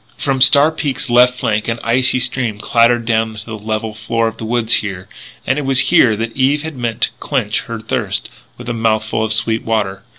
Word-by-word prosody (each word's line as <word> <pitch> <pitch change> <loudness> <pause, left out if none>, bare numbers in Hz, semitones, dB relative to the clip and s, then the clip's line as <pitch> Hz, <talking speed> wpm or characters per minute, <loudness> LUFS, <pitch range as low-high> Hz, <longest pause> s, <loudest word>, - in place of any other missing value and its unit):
From 135 -2 -1
Star 140 +4 +6
Peak's 135 -5 -3
left 125 +1 +4
flank 110 -4 -1
an 115 0 -1
icy 130 +3 +2
stream 125 -4 -1
clatters 115 +1 +2
down 110 -1 0
to 105 +1 -7
the 115 - -7
level 110 +1 -4
floor 115 +1 -1
of 115 0 -6
the 110 - -6
woods, 120 0 +2
here; 95 -3 -5 0.4
and 135 +3 0
it - - -3
was 135 -1 +2
here 115 -3 +5
that 115 +1 -5
Eve 140 +3 +1
had 160 -2 -6
meant 120 -3 -4
to - - +3
quench - - -1
her - - -6
thirst - - -2 0.3
with 120 - -11
a 120 - -2
mouthful 110 -1 -1
of 110 - -2
sweet 110 0 +1
water. 100 -4 -2
115 Hz, 210 wpm, -16 LUFS, 110-125 Hz, 0.4 s, Star